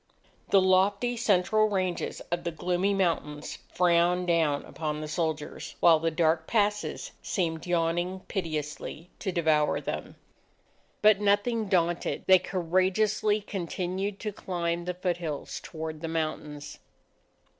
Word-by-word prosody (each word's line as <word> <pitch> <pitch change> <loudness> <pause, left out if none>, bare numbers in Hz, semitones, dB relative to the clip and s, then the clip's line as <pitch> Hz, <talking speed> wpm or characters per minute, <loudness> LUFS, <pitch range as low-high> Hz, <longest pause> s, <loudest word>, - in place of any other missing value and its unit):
The 195 - +6
lofty 200 +6 +3
central 215 -1 +3
ranges 185 -3 -2
of 175 0 -1
the - - -1
gloomy 180 +4 0
mountains 165 -6 -1
frowned 175 0 +3
down 160 -4 +1
upon 150 -1 -4
the 155 - -5
soldiers, 155 -1 -3
while 165 -2 +6
the 165 +1 +1
dark 160 0 +1
passes 210 -2 0
seemed 165 -4 -2
yawning 175 +2 0
pitilessly 160 -1 -4
to 195 - -2
devour 155 -3 +2
them. - - -5 0.9
But 210 -1 +6
nothing 210 +2 +2
daunted, 175 -2 0
they 185 -1 +7
courageously 190 +4 +1
continued 190 +1 -3
to 210 - -2
climb 170 -2 -2
the 180 0 -3
foothills 175 -5 -3
toward 160 -2 -6
the 165 - -3
mountains. 155 -2 -4
175 Hz, 125 wpm, -28 LUFS, 160-195 Hz, 0.9 s, they